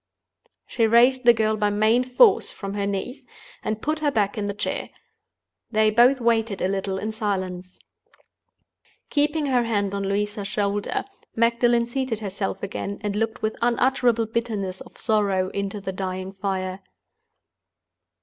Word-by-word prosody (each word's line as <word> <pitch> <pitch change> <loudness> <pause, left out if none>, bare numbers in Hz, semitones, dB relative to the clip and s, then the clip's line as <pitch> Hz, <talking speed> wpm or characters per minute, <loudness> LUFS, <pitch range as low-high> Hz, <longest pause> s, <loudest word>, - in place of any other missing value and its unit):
She 225 -2 +1
raised 245 +3 +4
the 240 - +9
girl 220 -1 +1
by 210 -1 +1
main 215 +4 +3
force 255 - +4
from 195 -1 -6
her 200 -1 -1
knees, 200 +7 -4 0.4
and 215 0 -3
put 305 +1 -1
her 300 -1 +1
back 210 -6 0
in 205 -1 -2
the 200 - -2
chair. - - -3 0.8
They 215 -1 +3
both 245 +5 +5
waited 225 -3 +1
a - - +1
little 195 0 -2
in 215 +3 -3
silence. 185 -4 -3 1.3
Keeping 295 +1 +1
her 255 -3 +2
hand 205 -3 0
on 200 - -2
Louisa's 205 +1 -2
shoulder, 205 0 -1 0.3
Magdalen 235 +1 +3
seated 255 -1 -2
herself 200 -2 -4
again, 200 0 -4
and 205 -1 -2
looked 225 +1 -2
with 215 0 0
unutterable 240 -1 +2
bitterness 215 -5 -3
of - - -13
sorrow 200 -4 +1
into 200 +1 -4
the 190 -1 -4
dying 185 0 -4
fire. 190 -1 -3
215 Hz, 150 wpm, -24 LUFS, 200-235 Hz, 1.3 s, the